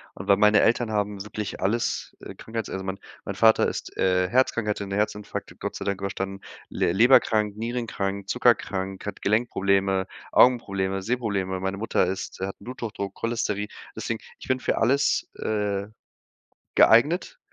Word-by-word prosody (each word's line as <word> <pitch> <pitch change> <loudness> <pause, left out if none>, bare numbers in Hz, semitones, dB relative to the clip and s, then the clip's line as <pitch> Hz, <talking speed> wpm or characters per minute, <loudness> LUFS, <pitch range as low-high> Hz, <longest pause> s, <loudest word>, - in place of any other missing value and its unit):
Und 95 - -8
weil 100 -1 +5
meine 105 0 +5
Eltern 115 0 +2
haben 105 -2 -1
wirklich 105 0 -5
alles, 110 +5 -1
äh, - - -8
Krankheits 110 -1 -5
also, 95 - -4
mein 95 0 -4 0.3
mein - - -4
Vater 110 -1 +5
ist, - - -5
äh, 90 -1 +2
herzkrank, 120 0 +2
der 105 - +1
hatte 100 -1 -4
'nen 100 0 -3
Herzinfarkt 105 0 -3
Gott - - -4
sei - - -5
Dank 100 -1 -2
überstanden, 95 0 -4 0.3
le 85 - 0
leberkrank, 110 -2 +4
nierenkrank, 110 -4 -3
zuckerkrank, 95 -5 +1
hat 100 -1 -6
Gelenkprobleme, 100 -3 +1 0.2
Augenprobleme, 95 -6 +3
Sehprobleme. 100 -6 -1
Meine 95 +1 -2
Mutter 105 -3 +1
ist 95 +1 -5
hat 95 +1 -3
'n - - -16
Bluthochdruck, 110 -5 -5
Cholesterin. 105 -3 -2 0.3
Deswegen - - -3 0.2
ich - - -11
bin 130 0 +1
für - - -1
alles, 135 +5 +2
äh, 105 -2 -2 0.9
geeignet, 155 - +4
105 Hz, 155 wpm, -25 LUFS, 95-115 Hz, 0.9 s, weil